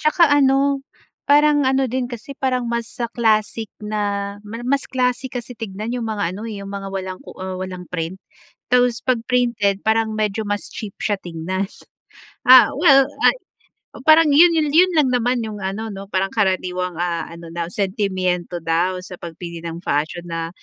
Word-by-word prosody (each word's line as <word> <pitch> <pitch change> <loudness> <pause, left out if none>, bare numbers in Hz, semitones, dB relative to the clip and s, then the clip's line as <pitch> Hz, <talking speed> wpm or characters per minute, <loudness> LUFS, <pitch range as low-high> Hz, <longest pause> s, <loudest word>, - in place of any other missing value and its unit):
'Tsaka 310 0 +4
ano, 275 0 +3 0.5
parang 295 0 +5
ano 265 0 +2
din 255 0 -2
kasi, 240 +4 -7
parang 255 -2 -1
mas 235 -1 -3 0.2
classic 220 -1 +1 0.2
na, 205 -1 -2
mar 230 +3 -8
mas 280 +1 +1
classic 250 0 -1
kasi 240 +1 -8
tignan 215 +1 -5
'yong 240 -2 -3
mga, 205 -5 -2
ano, 205 - -7
eh, 210 - -6
'yong 195 - -8
mga 200 -1 -5
walang 190 -1 -5
ku - - -12
ah, 185 0 -5
walang 185 -1 -6
print. 175 +1 -4 0.5
Tapos 245 -1 +3
'pag 255 -3 +1
printed 235 -6 +1
parang 220 0 +2
medyo 215 0 -1
mas 205 0 -2
cheap 210 -3 -7
siya 205 -2 +1
tignan. 180 +3 -3 0.8
Ah, 255 0 +9
well, 275 -4 +6 0.2
ay - - +6 0.6
o, - - -10
parang 315 +1 +6
'yon 335 +4 +7
'yon 300 -2 +1
'yon 365 +3 +6
lang 290 -4 +4
naman 245 0 +1
'yong 215 -1 -6
ano, 205 +4 -3
'no, 195 +1 -8
parang 195 +1 0
karaniwang, 185 -3 0
ah, 175 -1 -1
ano 170 0 -10
na, 170 -1 -3
sentimyento 185 -3 -1
daw 170 +3 +1
sa 185 - -8
pagpili 170 0 -8
ng 170 0 -5
fashion 155 +4 -1
na, 165 -1 -3
215 Hz, 175 wpm, -21 LUFS, 185-250 Hz, 0.8 s, Ah